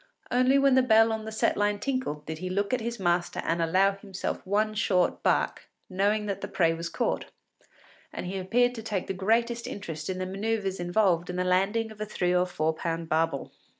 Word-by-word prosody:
Only 255 +2 +4
when 275 -1 +4
the 260 - +6
bell 225 -2 +5
on 220 0 -4
the 220 - -5
set 220 - +1
line 205 0 +1
tinkled 225 - -3
did 160 0 -5
he 185 +1 -4
look 200 +4 -1
at 255 - +1
his 235 0 -4
master 175 -1 0
and 170 +1 0
allow 185 +4 +3
himself 195 -1 -5
one 215 +2 +1
short 190 -4 +1
bark, - - 0 0.2
knowing 205 +3 +1
that 200 -1 -3
the - - -4
prey 165 -2 +2
was 165 +1 -4
caught; - - -1 0.9
and - - -6
he 190 +2 -3
appeared 245 +6 +2
to 230 - -6
take 210 -4 -3
the - - -3
greatest 230 +5 0
interest 160 -6 -6
in 185 - -2
the 185 - -2
manœuvres 195 0 -2
involved 175 -1 +1
in 180 - -3
the 180 - 0
landing 195 +5 +1
of 215 -1 -11
a 215 - -2
three 180 -3 0
or 180 0 +2
four 160 -2 0
pound 165 0 -4
barbel. 160 -3 0
195 Hz, 215 wpm, -27 LUFS, 180-220 Hz, 0.9 s, the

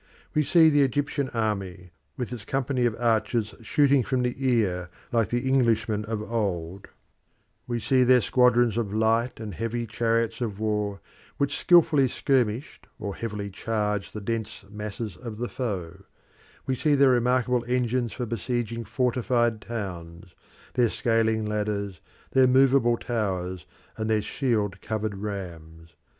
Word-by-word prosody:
We 150 - +3
see 160 +2 +5
the 145 -1 +4
Egyptian 140 +1 0
army, 95 -6 -3 0.3
with 125 -2 -4
its 115 -4 -7
companies 130 0 0
of 115 - -2
archers 115 -1 +1
shooting 140 +4 +3
from 125 +1 -1
the 125 0 0
ear 105 -9 +1 0.2
like 115 -2 +2
the 120 +2 -1
Englishmen 115 -5 +2
of 110 -1 -3
old; 95 -5 -3 0.8
we 120 -1 -1
see 130 +3 +2
their 125 0 +5
squadrons 120 -1 +3
of 110 -4 -1
light 115 +3 +1
and 110 -3 -6
heavy 115 +5 -3
chariots 115 +1 0
of 105 -4 -3
war, 105 -3 -1 0.4
which 140 0 0
skilfully 165 -6 +5
skirmished 125 -1 -1
or 100 -2 -4
heavily 105 -3 -5
charged 105 0 -2
the 105 - -4
dense 110 -1 -4
masses 105 0 -6
of 115 -3 -7
the 120 +2 -2
foe; 95 -8 -4 0.6
we 135 - 0
see 135 +4 +2
their 140 -1 +5
remarkable 125 0 +2
engines 125 -1 0
for 125 - -4
besieging 115 0 -3
fortified 120 -1 0
towns, 90 -6 -7 0.4
their 120 -2 +3
scaling 110 -1 +1
ladders, 105 -3 -2 0.3
their 130 -1 +5
movable 130 -2 +4
towers, 95 -7 -3 0.3
and 110 0 -2
their 110 -1 +2
shield 105 -7 -1
covered 110 -2 -3
rams. 85 -5 -7
115 Hz, 140 wpm, -26 LUFS, 105-125 Hz, 0.8 s, see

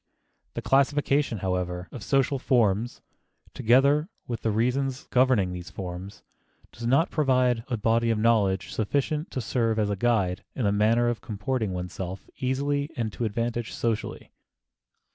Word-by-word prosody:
The - - -4
classification, 140 -2 +2
however, 90 -1 -2
of 120 - -8
social 135 +4 +1
forms, 115 -3 +1 0.5
together 140 - +3 0.2
with 120 -2 -4
the 115 - 0
reasons 125 +4 0
governing 125 -7 +3
these 90 -1 -7
forms, 95 +1 -7 0.5
does 115 +1 -6
not 140 +7 +3
provide 130 -5 +2
a 120 - -1
body 115 +2 +2
of 115 - +2
knowledge 105 -5 +2
sufficient 145 - -1
to 130 - -3
serve 115 -1 0
as 105 -1 +1
guide 100 -7 +1
in 130 - -2
the 100 - +3
matter 110 +4 +3
of 120 -1 -1
comporting 110 0 -2
one's 90 0 -5
self 95 +1 -6
easily 140 +3 0
and 110 -3 -2
to 120 - -2
advantage 115 +2 -2
socially. 115 -2 -3
115 Hz, 145 wpm, -26 LUFS, 105-130 Hz, 0.5 s, together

